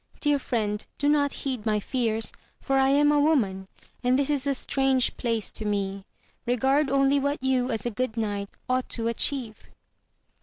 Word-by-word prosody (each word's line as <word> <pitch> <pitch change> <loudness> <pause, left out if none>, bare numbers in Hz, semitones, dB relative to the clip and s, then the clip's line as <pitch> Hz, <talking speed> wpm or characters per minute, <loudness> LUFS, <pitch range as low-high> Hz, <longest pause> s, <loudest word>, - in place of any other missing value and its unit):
Dear 290 -1 +2
friend, 215 -5 -2
do 285 - 0
not 290 -1 +3
heed 255 -5 -2
my 215 -1 +1
fears, 225 -1 -1 0.3
for 270 -1 +1
I 265 0 +4
am 290 +1 +4
a 295 - +3
woman, 215 -11 +1 0.4
and 250 +1 +3
this 280 +1 +1
is 285 -1 0
a 275 - +1
strange 265 -2 +1
place 230 -4 -2
to - - -5
me; 200 -2 -2 0.4
regard 270 +4 +2
only 275 +1 +3
what 285 +2 0
you, 260 -1 +1
as 225 -3 -2
a 240 - -1
good 230 +1 -3
knight, 205 -2 -2 0.2
ought 255 0 0
to 230 -1 -1
achieve. 235 -1 -1
255 Hz, 180 wpm, -26 LUFS, 220-275 Hz, 0.4 s, I